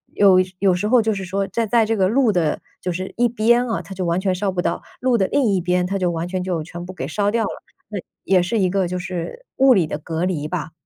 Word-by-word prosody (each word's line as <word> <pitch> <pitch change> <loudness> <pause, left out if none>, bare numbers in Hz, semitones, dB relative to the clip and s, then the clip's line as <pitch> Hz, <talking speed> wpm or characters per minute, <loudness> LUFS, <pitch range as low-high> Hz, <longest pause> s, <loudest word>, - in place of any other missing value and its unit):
有 195 -2 +6 0.2
有 190 0 +3
时 180 +4 -1
候 245 +1 +5
就 220 0 +1
是 195 -1 -4
说 195 +2 -1
在 230 -1 -1
在 230 +1 +3
这 225 +1 0
个 190 -3 +2
路 240 +2 +3
的 170 -6 0 0.2
就 180 - -2
是 185 +2 -5
一 240 +1 +2
边 235 +2 +2
啊， 225 - -1
它 195 - -9
就 185 -1 -3
完 170 +1 +1
全 190 -1 0
烧 195 +2 -1
不 185 - -4
到。 - - -1 0.2
路 255 -2 +3
的 190 - +2
另 285 - +1
一 195 -4 +2
边， 180 +1 +1
它 195 +2 -1
就 180 -1 +1
完 165 0 -3
全 185 0 -3
就 175 -4 -2
全 170 +2 -8
部 185 +1 -8
给 135 -7 -5
烧 205 +7 0
掉 225 +2 +1
了， - - -1 0.4
那 210 -2 -4 0.2
也 185 -1 +3
是 185 +6 -1
一 185 -2 +2
个 190 -2 +1
就 180 - -3
是 180 - -5
物 265 0 +6
理 180 -5 +3
的 150 - -4
隔 165 +2 -2
离 160 -5 -2
吧。 160 -1 -4
190 Hz, 300 characters per minute, -21 LUFS, 180-215 Hz, 0.4 s, 有